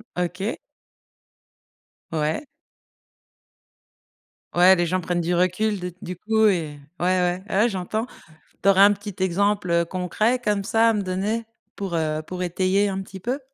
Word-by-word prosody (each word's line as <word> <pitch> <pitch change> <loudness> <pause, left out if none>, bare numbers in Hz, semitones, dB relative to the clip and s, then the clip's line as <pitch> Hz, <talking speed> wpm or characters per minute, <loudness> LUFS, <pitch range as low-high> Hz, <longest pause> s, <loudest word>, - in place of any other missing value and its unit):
OK. 180 +4 -2 1.5
Ouais. 160 - -1 2.1
Ouais, 180 +2 +7
les 175 -1 0
gens 185 +2 0
prennent 175 0 -1
du 175 +1 0
recul 185 +4 +1
d 180 -1 -5
du 180 - -6
coup 220 +4 +2
et 160 -7 -1 0.2
ouais, 175 - -1
ouais, 180 0 +1
ouais 210 +5 +2
j'entends. 215 +4 -3 0.5
Tu 200 - +4
aurais 195 -1 +4
un 205 +1 +8
petit 205 0 -8
exemple, 200 +1 +1
heu, 170 0 +3
concret 190 +8 0
comme 210 -4 0
ça 225 +2 +3
à - - +3
me 210 - 0
donner? 200 +5 -2 0.3
Pour, 190 -4 -4
heu, 155 -1 -1
pour 180 +1 -4
étayer 185 +3 +1
un 195 -1 -2
petit 190 0 -10
peu? 250 +8 -2
185 Hz, 155 wpm, -23 LUFS, 175-205 Hz, 2.1 s, un